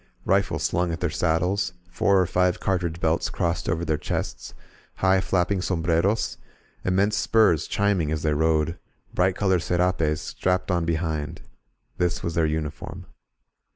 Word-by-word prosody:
Rifles - - +1
slung 85 0 0
at 80 - -4
their 90 -3 -1
saddles, 90 +2 0 0.2
four 100 +2 +3
or 90 - +3
five 90 +1 +1
cartridge 85 -3 -1
belts 80 -1 +1
crossed 85 -2 -1
over 85 +1 -1
their 80 -2 0
chests, - - -4 0.4
high, 95 0 +3
flap 90 -2 +1
ping 100 -2 0
sombreros, 85 +4 0 0.5
immense 100 +3 +2
spurs 100 -11 +3
chiming 100 -7 +1
as 80 -1 -2
they 75 -1 +2
rode, 80 +1 +1 0.3
bright 90 +1 +2
colored 95 -3 +2
serapes 85 -3 +1
strapped 90 0 -1
on 85 -2 +1
behind 80 -3 -2 0.3
— - - -40
^this 90 0 0
was 85 - -2
their 80 -1 +2
uniform. 75 -1 -4
85 Hz, 155 wpm, -25 LUFS, 80-95 Hz, 0.5 s, four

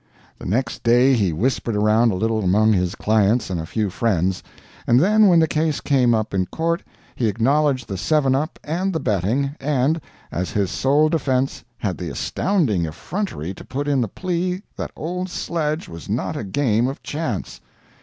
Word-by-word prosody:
The - - -7
next 115 +5 -1
day 125 +3 +4
he 100 -8 +2
whispered 115 +5 -1
around 110 +3 +3
a - - -2
little 110 +2 0
among 105 +4 +4
his 90 -2 0
clients 110 0 +2
and 90 - -1
a 80 - -7
few 105 -1 -1
friends, 95 -4 0 0.5
and 120 +1 +5
then 210 +6 +5
when 175 -3 +5
the 160 -1 +4
case 155 -1 0
came 125 -5 +3
up 110 -1 -2
in 95 -1 0
court 170 +1 -1 0.3
he 120 - 0
acknowledged 130 +3 +1
the 95 -3 -4
seven 145 +1 +2
up 150 +5 -1
and 180 +5 -1
the 160 - 0
betting, 110 - 0
and, 145 +3 +1 0.3
as 90 +2 -2
his 100 -3 -1
sole 145 +3 +3
defense, 135 -4 0
had - - -3
the - - -4
astounding 140 - 0
effrontery 90 - -4
to - - -11
put 140 +3 -4
in 140 -3 +2
the 115 - 0
plea 180 - -2
that - - -4
old 180 +4 -4
sledge 160 -3 -2
was 85 -1 -10
not - - -1
a - - -4
game 115 +2 +1
of 135 - -6
chance! 145 - -4
125 Hz, 185 wpm, -21 LUFS, 105-155 Hz, 0.5 s, and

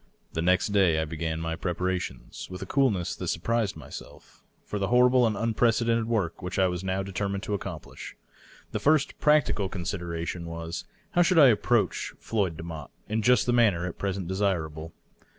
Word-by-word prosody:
The 80 - -1
next 90 +4 +2
day 95 -6 +3
I 80 - 0
began 80 0 -3
my 80 0 -2
preparations, 90 -8 -3
with 90 0 -6
a - - -6
coolness 120 - +1
that - - -6
surprised 115 -4 0
myself, 75 - -11 0.2
for 105 - -4
the 95 - 0
horrible 125 +1 +5
and 110 - -1
unprecedented 115 0 +2
work 105 -8 -1
which 90 +1 -4
I 95 -1 +4
had 90 0 -3
now 95 +1 -1
de 100 - -7
termined 100 +1 -2
to 105 - -3
accomplish. 90 -5 -6 0.6
The - - -2
first 150 -1 +2
practical 150 -10 +3
consideration 85 -2 -4
was, 85 0 -5 0.3
how 175 - +3
should 175 0 +3
I 145 -5 +9
approach 115 0 +1
Floyd 95 -8 -1
Demotte 80 -4 -7 0.2
in 110 +1 -1
just 120 0 +4
the 120 - +1
manner 105 -8 +3
at 90 - -6
present 95 -2 -2
desira 95 -5 0
ble? 80 +2 -8
95 Hz, 180 wpm, -27 LUFS, 85-115 Hz, 0.6 s, I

